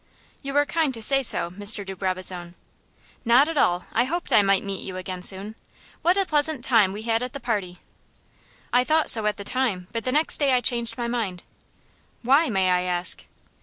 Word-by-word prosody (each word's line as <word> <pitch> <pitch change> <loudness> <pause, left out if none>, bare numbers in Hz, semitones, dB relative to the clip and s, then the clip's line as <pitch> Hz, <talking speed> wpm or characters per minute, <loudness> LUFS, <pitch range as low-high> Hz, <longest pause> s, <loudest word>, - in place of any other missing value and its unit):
"You 275 0 -3
are 290 - +4
kind 320 -2 0
to 225 - -9
say 275 +4 +5
so, 175 -8 +1
Mr. 205 +2 -1
de 190 0 -7
Brabazon." 185 -2 -4 0.7
"Not 245 +5 +4
at 325 - -4
all. 180 -10 +1
I 240 - +2
hoped 345 +6 -3
I 210 - +7
might 195 -1 +2
meet 195 -1 -5
you 185 -1 -7
again 185 0 -6
soon. 195 +3 -1 0.5
What 355 +3 +2
a 390 - +2
pleasant 300 -4 0
time 225 -7 +4
we 210 +2 -7
had 225 0 0
at 250 0 -5
the 280 - -6
party." 200 -8 -3 1.0
"I 250 - +4
thought 315 +3 +2
so 220 -2 +1
at 210 0 -1
the 200 - -7
time, 205 -6 -2
but 230 -1 -4
the 255 - -2
next 305 +4 +2
day 280 -3 +2
I 250 - +4
changed 235 -2 -2
my 240 -1 -3
mind." 215 -7 -3 0.8
"Why, 280 +6 +3
may 190 -4 +1
I 180 0 +2
ask?" 180 0 0
225 Hz, 205 wpm, -24 LUFS, 190-270 Hz, 1.0 s, I